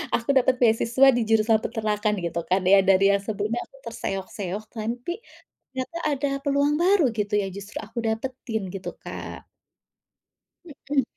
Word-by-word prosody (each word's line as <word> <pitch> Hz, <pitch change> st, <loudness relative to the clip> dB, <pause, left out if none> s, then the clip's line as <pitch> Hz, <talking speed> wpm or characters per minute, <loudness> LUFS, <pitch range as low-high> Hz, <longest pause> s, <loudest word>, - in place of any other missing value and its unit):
aku 235 Hz, +3 st, -4 dB
dapat 255 Hz, 0 st, +3 dB
beasiswa 235 Hz, +3 st, +4 dB
di 240 Hz, -, +1 dB
jurusan 220 Hz, 0 st, +4 dB
peternakan 215 Hz, -2 st, -1 dB
gitu 170 Hz, 0 st, -2 dB
kan 185 Hz, +1 st, +3 dB
ya, 200 Hz, -, +8 dB
dari 195 Hz, 0 st, +4 dB
yang 200 Hz, -, +1 dB
sebelumnya 215 Hz, +3 st, -2 dB
aku 270 Hz, -, -19 dB, 0.2 s
terseok-seok, 195 Hz, -1 st, -4 dB
tapi 235 Hz, +7 st, -4 dB, 0.6 s
ternyata 260 Hz, +6 st, -4 dB
ada 285 Hz, 0 st, 0 dB, 0.2 s
peluang 285 Hz, +1 st, +2 dB
baru 370 Hz, -2 st, +4 dB
gitu 210 Hz, 0 st, -1 dB
ya, -, -, -2 dB
justru 200 Hz, +1 st, -9 dB
aku 235 Hz, -, -8 dB
dapetin 225 Hz, -1 st, -3 dB
gitu, 185 Hz, -2 st, -5 dB
Kak. -, -, -8 dB, 1.4 s
Mhm. 280 Hz, -2 st, +3 dB
225 Hz, 145 wpm, -25 LUFS, 200-260 Hz, 1.4 s, ya